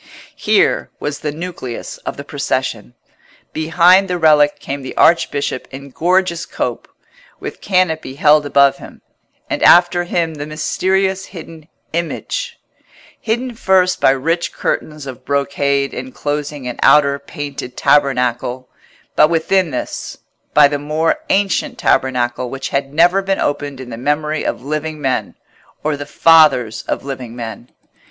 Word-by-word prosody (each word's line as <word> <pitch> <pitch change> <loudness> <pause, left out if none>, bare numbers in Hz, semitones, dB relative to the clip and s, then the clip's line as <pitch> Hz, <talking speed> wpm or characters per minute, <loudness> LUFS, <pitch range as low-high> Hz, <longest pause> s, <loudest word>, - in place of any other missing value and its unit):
Here - - +2
was 145 -1 -4
the 150 - -3
nucleus 155 -7 -6
of - - -6
the - - -6
procession. - - -3 0.6
Behind 175 +4 +4
the 180 -1 -1
relic 150 -3 +4
came 140 +1 -5
the 130 - -8
archbishop 145 -5 +2
in 140 +1 -10
gorgeous 175 +2 +1
cope, - - -4 0.5
with - - -7
canopy 160 -7 0
held 150 +1 +4
above 140 -1 +3
him; - - -13 0.4
and - - -3
after 175 0 +5
him 170 -2 -1
the 150 -1 -6
mysterious 190 +5 0
hidden 160 -3 -11 0.3
Image—hidden 240 - -5
first 190 -4 +2
by - - +5
rich 165 +6 0
curtains 150 -2 -3
of 130 -3 -9
brocade 140 0 0
enclosing 150 - -4
an 125 - -6
outer 140 -1 +5
painted 140 -3 -7
tabernacle, 125 -2 +1 0.5
but 150 - +5
within 170 +2 +1
this, 125 - -5 0.4
by 145 -1 +8
the 145 0 -3
more 155 - 0
ancient 195 0 0
tabernacle 125 -1 0
which 135 +1 -5
had 140 0 -2
never 175 +5 +4
been 195 0 -1
opened 145 -1 -2
in 125 -2 -9
the 115 - -6
memory 150 +4 -1
of - - -3
living 155 +2 -3
men, 135 -3 -2 0.5
or 155 0 0
the 145 0 -7
fathers 150 -9 +4
of - - -2
living 130 -4 -6
men. 115 0 -7
150 Hz, 135 wpm, -17 LUFS, 140-170 Hz, 0.6 s, by